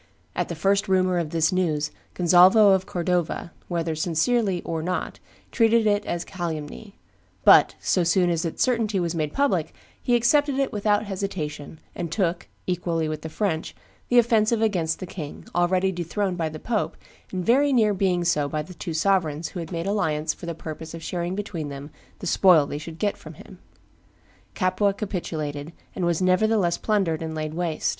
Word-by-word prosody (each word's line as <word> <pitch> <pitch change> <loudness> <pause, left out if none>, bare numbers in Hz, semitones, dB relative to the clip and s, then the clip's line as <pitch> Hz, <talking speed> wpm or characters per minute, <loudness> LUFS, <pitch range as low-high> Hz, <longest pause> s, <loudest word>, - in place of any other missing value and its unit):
At - - -1
the - - -4
first 200 +1 +1
rumor 185 -1 +2
of 165 -3 -2
this 160 +1 +1
news, 155 -5 0 0.2
Gonzalvo 185 +4 +6
of 190 0 0
Cordova, 175 -1 -1 0.2
whether 170 -2 -1
sincerely 180 +5 0
or 165 -1 -3
not, 180 +3 -3 0.3
treated 230 -1 +3
it 205 -1 +2
as 175 0 -2
a - - -20
calumny; 175 +2 -6 0.5
but, - - +7
so 180 - +1
soon 175 +1 +3
as 165 -1 0
its 165 - -1
certainty 225 -5 +1
was 170 -2 -1
made 155 -3 -2
public, 280 - 0 0.3
he 245 - +2
accepted 285 +4 +3
it 275 -1 0
without 210 0 +1
hesitation, 160 -7 -5
and 170 -2 -5
took, 175 -2 -1 0.2
equally 170 -3 -1
with 155 -1 -4
the 160 - -6
French, 165 -2 -2 0.3
the 245 - +3
offensive 230 -1 +4
against 180 -8 0
the 185 - -6
king, 160 -5 -8
already 180 +2 +2
dethroned 180 +2 -2
by 165 -3 -1
the 155 - -8
pope, 220 +6 -2 0.3
and 185 -2 -3
very 280 +5 +4
near 220 -5 +3
being 185 -2 +1
so 150 -4 +1
by 155 0 -2
the 180 - -11
two 165 -1 -6
sovereigns 165 -3 +1
who 180 - -7
had 165 - -6
made 170 -1 -3
alliance 160 -6 0
for 170 - -10
the 170 - -3
purpose 160 +1 -7
of 165 - -9
sharing 175 +2 -3
between 185 -7 -4
them 140 +1 -8 0.3
the - - -8
spoil 175 -6 +5
they 145 +1 -5
should 160 +1 -9
get 205 +1 -1
from - - -11
him. - - -14 1.0
Capua 195 +1 +1
capitulated, 160 -7 -4 0.2
and 180 - -1
was 170 +1 +1
nevertheless 185 -1 +2
plundered 190 -7 0
and 160 -1 -4
laid 155 0 -3
waste. 165 -2 -1
180 Hz, 180 wpm, -24 LUFS, 160-200 Hz, 1.0 s, but